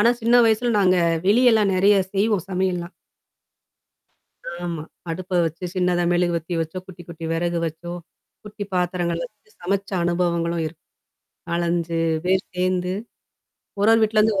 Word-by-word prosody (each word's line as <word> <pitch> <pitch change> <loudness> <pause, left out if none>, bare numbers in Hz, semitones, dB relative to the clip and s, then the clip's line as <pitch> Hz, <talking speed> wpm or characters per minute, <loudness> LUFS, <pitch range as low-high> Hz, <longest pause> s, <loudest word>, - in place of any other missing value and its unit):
ஆனா 230 +3 +5
சின்ன 235 +2 +4
வயசுல 225 +2 +2
நாங்க 185 -1 +4 0.3
வெளியெல்லாம் 220 -2 +4
நறைய 200 +2 +4 0.2
செய்வோம் 200 -2 +1
சமையல்லாம். 180 -1 -1 1.7
ஆமா. 170 -3 -3 0.3
அடுப்ப 180 +2 -2
வச்சோ, 165 +3 -5
சின்னதா 180 -1 +1
மெழுகு 175 0 +1
வத்தி 170 +2 -4
வச்சோ, 165 +3 -4
குட்டி, 180 -2 -11
குட்டி 165 -1 -8
வெறகு 170 +1 -1
வச்சோ. 165 +2 -6 0.5
குட்டி 210 0 -6
பாத்திரங்கள்ல 175 -1 -1
வந்து 215 0 -32
சமைச்ச 195 +2 -2
அனுபவங்களும் 170 -1 0
இருக்கு. 155 +1 -10 0.7
4,5 170 -1 0 0.3
பேர் 190 +1 +2
சேர்ந்து. 180 0 0 0.9
ஒரு 210 +2 +5
ஒரு 225 - +5
வீட்லேருந்து 215 -1 +3
180 Hz, 130 wpm, -22 LUFS, 170-200 Hz, 1.7 s, ஆனா